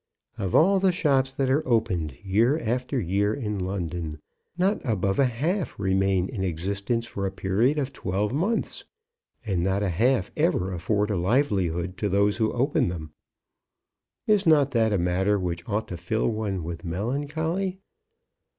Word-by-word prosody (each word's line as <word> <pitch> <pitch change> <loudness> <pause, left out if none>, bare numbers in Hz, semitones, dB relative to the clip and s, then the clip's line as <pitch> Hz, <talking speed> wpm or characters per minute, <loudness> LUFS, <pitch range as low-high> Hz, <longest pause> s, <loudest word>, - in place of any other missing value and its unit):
Of 95 -4 -1
all 195 +4 +5
the 190 0 +3
shops 135 -6 +2
that 135 0 0
are 145 +4 +3
opened 95 - +1
year 110 +9 +3
after 125 0 -1
year 100 +2 +1
in 105 -7 -3
London, 85 -4 -3 0.4
not 190 +4 +1
above 100 -5 0
a 140 - +5
half 155 - -2
remain 95 -1 +1
in 100 -5 -4
existence 100 +7 -2
for 100 -4 -3
a - - -3
period 105 +10 +1
of 140 -2 -2
twelve 100 +4 -2
months; 195 +11 -1 0.6
and 95 -5 0
not 95 +3 +1
a 100 - +1
half 115 +4 +1
ever 95 +1 +1
afford 105 +4 0
a 100 - 0
livelihood 90 - 0
to 105 - -1
those 100 +1 +2
who 110 -2 +1
open 130 +4 +1
them. 80 -4 -5 1.1
Is 205 -3 +3
not 145 -3 +5
that 115 -3 +2
a 100 - +2
matter 95 +3 +1
which 85 -2 -4
ought 105 +1 -1
to 90 - -5
fill 90 +6 0
one 105 -5 -2
with 85 +1 -6
melancholy? 150 - -2
105 Hz, 160 wpm, -26 LUFS, 95-135 Hz, 1.1 s, all